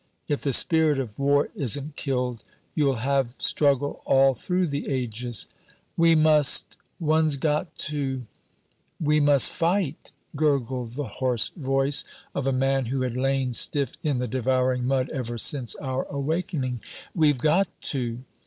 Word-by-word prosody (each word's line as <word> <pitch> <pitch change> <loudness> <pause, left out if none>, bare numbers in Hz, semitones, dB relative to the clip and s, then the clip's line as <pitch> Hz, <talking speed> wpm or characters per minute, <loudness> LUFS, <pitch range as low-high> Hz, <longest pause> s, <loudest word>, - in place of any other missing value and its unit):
"If 145 - -1
the 140 - 0
spirit 160 +2 +4
of 125 -5 -5
war 140 +1 +2
isn't 145 - -1
killed, 125 -4 -2 0.3
you'll 140 -3 +1
have 135 -3 0
struggle 145 -1 +1
all 135 0 +4
through 180 +9 -1
the 145 -3 -4
ages." 120 -4 -2 0.5
"We 165 0 +4
must 155 -2 +4 0.2
one's 155 -2 +2
got 150 +4 -2
to 135 -3 -3 0.4
" - - -43
"We 150 0 +4
must 145 -3 +4
fight!" 170 -4 -1 0.2
gurgled 130 -5 -1
the 145 +3 -4 0.2
hoarse 125 -3 +1
voice 135 -2 +1 0.3
of 135 -1 -2
a - - +2
man 135 -1 0
who 130 +2 -2
had 125 -2 -2
lain 135 -1 0
stiff 140 +2 +1
in 145 -4 0
the 125 0 -2
devouring 130 +1 0
mud 130 -1 0
ever 120 -5 -4
since 125 +1 +2
our 130 -1 -3
awakening; 140 - -3 0.3
"we've 150 -5 +3
got 160 +9 +2 0.3
to!" 125 -2 -3
135 Hz, 145 wpm, -25 LUFS, 130-150 Hz, 0.5 s, spirit